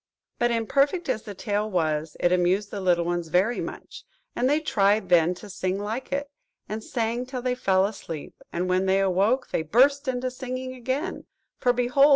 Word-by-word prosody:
But 240 - +3
imperfect 275 +8 +1
as 220 - 0
the 210 -2 -8
tale 210 +1 -1
was, 155 -4 -1
it 175 - +3
amused 180 +3 +2
the 200 - -4
little 175 -2 +2
ones 175 -1 -1
very 185 +9 +2
much, - - -8 0.3
and 250 +2 +2
they 295 +2 +3
tried 205 - +2
then 175 0 +4
to 210 - -11
sing 185 -1 -2
like 215 +5 -4
it, 280 0 -2 0.4
and 215 +1 -5
sang 235 +1 -2
till 255 -2 -5
they 250 -1 +1
fell 195 -6 +2
asleep 170 -7 -6 0.2
and 180 +2 -1
when 185 +1 +1
they 190 +1 +3
awoke, 195 +7 +2
they - - 0
burst 270 - +3
into 255 0 -1
singing 255 0 -5
again; 260 +8 -3 0.3
for, 250 - +3
behold! 250 +4 +4
215 Hz, 190 wpm, -26 LUFS, 185-255 Hz, 0.4 s, then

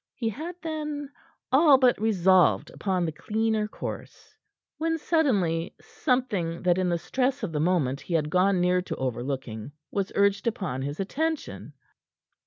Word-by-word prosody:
He 230 -3 -1
had, 315 - -6
then, 300 -3 -4 0.4
all 280 0 +7
but 250 -5 +3
resolved 185 -4 +3
upon 185 -3 -1
the 160 - -2
cleaner 220 +5 -1
course, - - -8 0.4
when, 325 +1 0
suddenly, 200 - +1
something 250 - -1
that 180 0 +3
in 185 -1 +1
the 170 - +1
stress 255 +8 -1
of 200 - -2
the 150 - -2
moment 150 -5 +1
he 170 - -3
had 150 -2 0
gone 185 +1 +3
near 180 +1 +2
to 180 - -5
overlooking, 130 -1 -4 0.2
was 200 -1 -2
urged 200 +2 +2
upon 190 - -2
his 145 +2 -4
attention. 310 +11 -3
195 Hz, 150 wpm, -26 LUFS, 170-260 Hz, 0.4 s, all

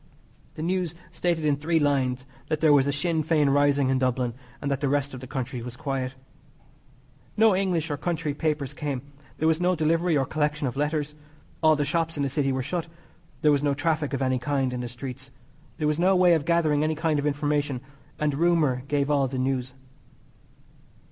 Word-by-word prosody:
The 155 - -5
news 175 -1 -1 0.2
stated 170 -3 -1
in 145 -2 +2
three 165 +3 0
lines 130 -4 +1 0.2
that 155 -1 -1
there 155 -2 +5
was 140 -1 +4
a - - +2
Sinn 160 +3 0
Fein 150 -2 +2
rising 140 -1 +3
in 135 -1 +2
Dublin, 125 -2 0 0.3
and 140 - -2
that 140 0 -1
the 140 - +1
rest 140 0 0
of 130 - -6
the 130 - -9
country 130 -1 -4
was 120 +1 -8
quiet. 135 -4 -3 1.2
No 220 -2 +5
English 175 -5 0
or 145 - -1
country 165 -3 -2
papers 150 -3 -2
came. 140 -5 -4 0.3
There 160 - +1
was 160 +1 +2
no 180 +1 +3
delivery 165 +1 +2
or 135 - +1
collection 150 +1 -1
of 125 - -2
letters. 150 +1 -1 0.5
All 155 -1 +5
the 145 -1 0
shops 165 +1 -1
in 145 - 0
the 140 - 0
City 135 0 0
were 130 0 -1
shut. 170 +4 -3 0.6
There 150 - +6
was 145 -1 +2
no 145 -1 +1
traffic 150 0 0
of 135 0 -1
any 130 -1 +1
kind 135 0 -1
in 125 - -3
the 120 - -4
streets. 130 +2 -8 0.5
There 150 - 0
was 150 +1 0
no 190 +2 +4
way 180 -1 +5
of 155 -4 +1
gathering 160 -3 +2
any 155 0 0
kind 155 -1 0
of 145 - 0
information, 145 -2 0 0.4
and 150 -1 0
rumour 155 -5 +2
gave 145 0 0
all 140 -2 +3
the 130 +1 -5
news. 130 -1 -1
145 Hz, 205 wpm, -26 LUFS, 135-160 Hz, 1.2 s, There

